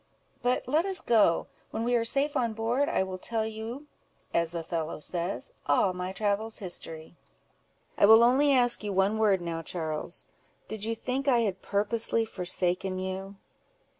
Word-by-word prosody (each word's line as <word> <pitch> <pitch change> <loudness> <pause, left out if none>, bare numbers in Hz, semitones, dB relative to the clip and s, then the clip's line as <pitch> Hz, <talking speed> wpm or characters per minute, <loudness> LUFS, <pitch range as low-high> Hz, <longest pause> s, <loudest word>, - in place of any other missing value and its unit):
But 250 0 0
let 305 +6 +2
us 385 0 0
go: 205 -8 +3 0.2
when 225 - -3
we 245 +1 0
are 235 - +2
safe 280 +5 0
on 235 -4 0
board, 235 +6 0
I - - +1
will 185 -1 -6
tell 225 +2 -1
you, 220 +6 -6 0.5
as 170 0 +1
Othello 165 -1 -3
says—'All 175 0 -1
my 180 +1 -4
travels' 210 +2 -1
history." 165 -3 -6 0.8
"I 200 - +7
will 225 +2 +8
only 270 +4 +4
ask 245 -4 +4
you 205 -1 -2
one 195 +3 +2
word 200 -4 +3
now, 165 -1 -4
Charles—Did 165 +6 -5
you 225 0 -1
think 255 +4 -3
I 245 -3 +4
had 195 -4 -2
purposely 225 +2 +1
forsaken 185 -1 -1
you?" 190 +1 -5
210 Hz, 155 wpm, -28 LUFS, 180-235 Hz, 0.8 s, will